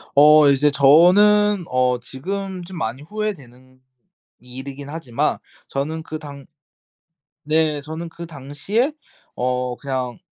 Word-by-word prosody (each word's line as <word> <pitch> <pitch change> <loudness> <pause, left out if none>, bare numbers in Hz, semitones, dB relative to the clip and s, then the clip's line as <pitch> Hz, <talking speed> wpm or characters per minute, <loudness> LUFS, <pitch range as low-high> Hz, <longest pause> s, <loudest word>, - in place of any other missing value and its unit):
어 150 +1 +7
이제 140 +2 +3
저는 185 +8 +5
어 125 -1 +1
지금 185 +9 -6
좀 185 +1 -10
많이 125 -4 -4
후회되는 135 - -7 0.6
일이긴 135 +3 -9
하지만 145 -7 -2 0.3
저는 155 +4 -3
그 155 -1 -6
당 140 -2 -10 1.0
네. 155 -1 +1
저는 160 +3 -7
그 170 +1 -9
당시에 165 - -2 0.4
어 125 0 -1
그냥, 130 -4 -4
145 Hz, 205 characters per minute, -21 LUFS, 130-170 Hz, 1.0 s, 어